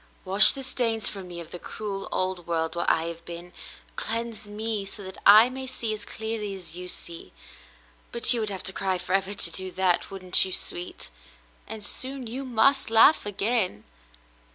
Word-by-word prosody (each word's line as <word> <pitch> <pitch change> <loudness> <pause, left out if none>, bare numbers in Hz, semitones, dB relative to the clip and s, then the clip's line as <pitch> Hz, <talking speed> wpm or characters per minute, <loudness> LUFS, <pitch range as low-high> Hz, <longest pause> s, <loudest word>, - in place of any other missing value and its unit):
Wash 195 +3 +9
the 270 - -6
stains 230 -4 0
from 195 -3 -6
me 175 -1 -8
of 170 -1 -10
the 175 - -7
cruel 200 -1 -6
old 185 -2 -2
world 165 -1 -2
where 170 - 0
I 160 - +2
have 170 0 -7
been; 175 +1 -10 0.4
cleanse 230 -1 -3
me 215 0 -3
so 200 +1 -6
that 190 0 -9
I 215 +3 +9
may 260 +1 -7
see 235 -3 -2
as 210 -1 -7
clearly 220 -2 -5
as 175 -3 -8
you 180 0 -7
see; 170 - -8 0.8
but 235 +1 +5
you 240 - -1
would 215 -1 -2
have 195 -2 -6
to 190 +1 -1
cry 190 -1 -1
forever 190 +2 -1
to - - -1
do 190 0 -3
that, 185 -2 +1
wouldn't 185 -2 +2
you, 190 - -4
sweet? 175 - -4 0.6
And 215 -2 -6
soon 260 +4 -3
you 255 +4 -6
must 260 +2 +3
laugh 225 +2 +5
again." 205 - -1
200 Hz, 185 wpm, -26 LUFS, 180-225 Hz, 0.8 s, Wash